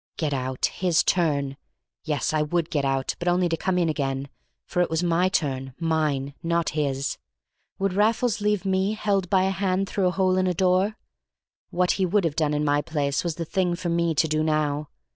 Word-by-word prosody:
Get 150 -3 -1
out! 130 -1 -1
His 175 -3 +1
turn! 140 -6 +1 0.5
Yes, 150 -1 -1
I 155 - +2
would 165 +2 -1
get 145 -3 0
out, 135 -1 0
but 175 - -4
only 175 0 +3
to 165 - 0
come 185 +2 -1
in 175 -2 +2
again, 140 -3 -2 0.4
for 180 - 0
it 175 - +1
was 160 +2 0
my 175 +2 +2
turn—mine—not 150 +1 -1
his. 140 -3 -2 0.6
Would 195 -1 0
Raffles 220 +2 +1
leave 210 -2 0
me 190 +2 +1
held 200 -4 0
by 190 -2 +3
a 190 - +1
hand 195 0 0
through 190 -2 0
a - - +4
hole 185 0 +1
in 185 - +1
a 180 - 0
door? 190 +4 +2 0.7
What 180 0 +1
he 190 -2 +1
would 200 +2 +2
have 155 -3 -1
done 150 -2 +1
in 150 0 0
my 145 0 +2
place 140 -3 -1
was 170 -3 -2
the 165 -1 -4
thing 180 +1 0
for 175 0 -4
me 170 -1 +1
to 160 - +3
do 155 0 0
now. 150 -1 0
170 Hz, 200 wpm, -25 LUFS, 150-185 Hz, 0.7 s, a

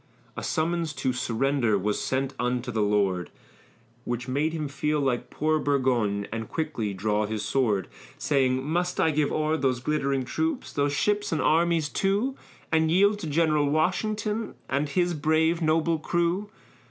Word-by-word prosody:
A - - -5
summons 165 0 -1
to 130 -3 -1
surrender 125 -1 +1
was 105 +2 -1
sent 135 +1 -1
unto 125 0 -1
the 110 -2 0
lord, 100 -4 +1 0.7
Which 120 +1 -3
made 145 +5 0
him 155 -2 -3
feel 150 +2 -1
like 130 -4 -1
poor 155 +1 0
Burgoyne 125 -8 +1
and 115 0 -4
quickly 150 -10 -2
draw 105 +2 0
his 110 -1 -3
sword, 110 -9 +1 0.3
Saying, 130 -2 +1
"Must 175 +3 -1
I 160 - +3
give 150 -1 +1
o'er 155 +1 +1
those 130 -4 0
glittering 140 -1 0
troops, 320 - -2
those 145 0 +1
ships 205 +7 0
and 160 - 0
armies 165 0 +2
too, 200 - 0 0.4
And 160 0 +3
yield 200 +5 +4
to 165 - -5
General 150 -1 +2
Washington, 210 +7 -1
and 140 +2 -1
his 175 +4 +1
brave 160 +2 +2
noble 160 0 +2
crew?" 175 +5 0
150 Hz, 155 wpm, -26 LUFS, 125-165 Hz, 0.7 s, yield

